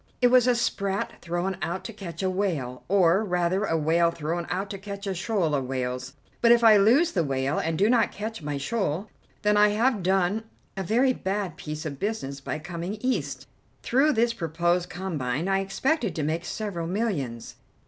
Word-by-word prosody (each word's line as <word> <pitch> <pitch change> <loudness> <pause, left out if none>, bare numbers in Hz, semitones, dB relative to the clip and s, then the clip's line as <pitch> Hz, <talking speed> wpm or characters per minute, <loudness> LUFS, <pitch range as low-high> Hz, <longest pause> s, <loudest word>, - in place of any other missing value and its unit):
It 245 - +5
was 250 0 +5
a 250 - +4
sprat 200 -4 -2
thrown 175 +2 -2
out 175 +2 -3
to 225 - -7
catch 185 -4 -7
a 190 - +2
whale, 160 -11 -2
or, 190 +1 +4
rather, 180 +1 0
a 165 - +1
whale 165 +2 +3
thrown 170 +1 -3
out 195 +3 -2
to 195 - -6
catch 200 0 -7
a 195 - -1
shoal 185 -3 0
of 135 -3 0
whales. 125 0 -3 0.3
But 235 - +6
if 235 0 +5
I 220 -2 +8
lose 240 +12 +4
the 175 - +1
whale 135 0 -1
and 160 0 -1
do 200 - +4
not 235 -1 +3
catch 220 -1 -5
my 145 -1 -3
shoal, 195 +3 -2 0.3
then 210 0 +3
I 210 0 +7
have 220 +1 +1
done 190 +4 +1 0.3
a 195 - -3
very 240 +7 +2
bad 195 -3 -3
piece 155 0 -6
of 140 -3 -5
business 165 -10 -3
by - - -3
coming 175 +4 -5
East. 255 +3 -2 0.4
Through 280 +5 +3
this 235 +1 +2
proposed 175 -1 0
combine 160 -5 -3
I 195 0 +2
expected 210 - 0
to 155 - -1
make 160 +3 -1
several 185 -6 -4
millions. 170 - -3
190 Hz, 190 wpm, -26 LUFS, 165-215 Hz, 0.4 s, I